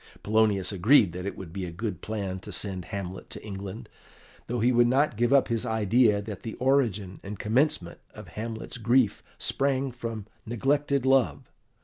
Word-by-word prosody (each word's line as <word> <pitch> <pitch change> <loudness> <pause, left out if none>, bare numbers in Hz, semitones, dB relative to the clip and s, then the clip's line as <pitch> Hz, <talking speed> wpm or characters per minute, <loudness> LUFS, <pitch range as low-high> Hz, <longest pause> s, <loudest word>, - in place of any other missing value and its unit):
Polonius 105 -3 +2
agreed 100 0 +5
that 90 +2 -5
it - - -5
would 85 -4 -9
be 95 0 -4
a 90 - -4
good 90 0 -4
plan 100 -4 -3
to - - -10
send 95 -4 -2
Hamlet 95 -1 -6
to - - -9
England, 100 +1 -7 0.6
though 120 +1 -2
he 120 +3 +3
would 120 -1 +5
not 135 +1 +2
give 120 +3 +1
up 140 -1 +5
his 115 -2 -1
idea 110 -1 +3
that 105 -2 -7
the 115 - -6
origin 115 -8 +1
and 100 +1 -7
commencement 110 - 0 0.2
of - - -10
Hamlet's 110 +2 -6
grief 120 0 +3 0.2
sprang 135 -1 0
from 115 -4 -6 0.2
neglected 140 +3 0
love. 130 - +2
110 Hz, 170 wpm, -27 LUFS, 95-125 Hz, 0.6 s, agreed